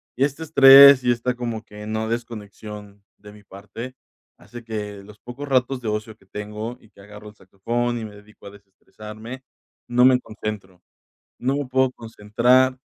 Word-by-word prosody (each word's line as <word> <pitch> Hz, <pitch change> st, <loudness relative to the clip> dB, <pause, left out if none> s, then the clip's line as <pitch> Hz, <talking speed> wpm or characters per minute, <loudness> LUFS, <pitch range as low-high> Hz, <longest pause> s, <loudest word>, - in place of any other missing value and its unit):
y 130 Hz, -, 0 dB
este 145 Hz, +3 st, -2 dB
estrés 140 Hz, -3 st, +8 dB
y 125 Hz, -, +2 dB
esta 120 Hz, +1 st, -2 dB
como 120 Hz, -2 st, -5 dB
que 105 Hz, -1 st, -12 dB
no 110 Hz, 0 st, -3 dB
desconexión 105 Hz, -3 st, -8 dB
de 105 Hz, 0 st, -15 dB
mi 105 Hz, -1 st, -17 dB
parte, 115 Hz, +6 st, -10 dB, 0.4 s
hace 120 Hz, +2 st, -12 dB
que 105 Hz, -3 st, -6 dB
los 105 Hz, +1 st, -16 dB
pocos 130 Hz, +4 st, -9 dB
ratos 130 Hz, 0 st, 0 dB
de 110 Hz, -, -3 dB
ocio 105 Hz, +1 st, -4 dB
que 95 Hz, -, -26 dB
tengo 105 Hz, +4 st, -7 dB
y 110 Hz, -, -22 dB
que 100 Hz, -, -19 dB
agarro 105 Hz, +1 st, -13 dB
el 105 Hz, -, -18 dB
saxofón 120 Hz, +6 st, -3 dB
y 110 Hz, -, -6 dB
me 105 Hz, -1 st, -11 dB
dedico 105 Hz, 0 st, -16 dB
a -, -, -8 dB
desestresarme, 110 Hz, +5 st, -12 dB, 0.4 s
no 125 Hz, +1 st, +3 dB
me 130 Hz, -1 st, +5 dB
concentro, 105 Hz, -5 st, -8 dB, 0.6 s
no 135 Hz, +3 st, -1 dB
me 145 Hz, -2 st, -3 dB
puedo 130 Hz, 0 st, +1 dB
concentrar, 120 Hz, +4 st, +1 dB
110 Hz, 175 wpm, -22 LUFS, 105-125 Hz, 0.6 s, estrés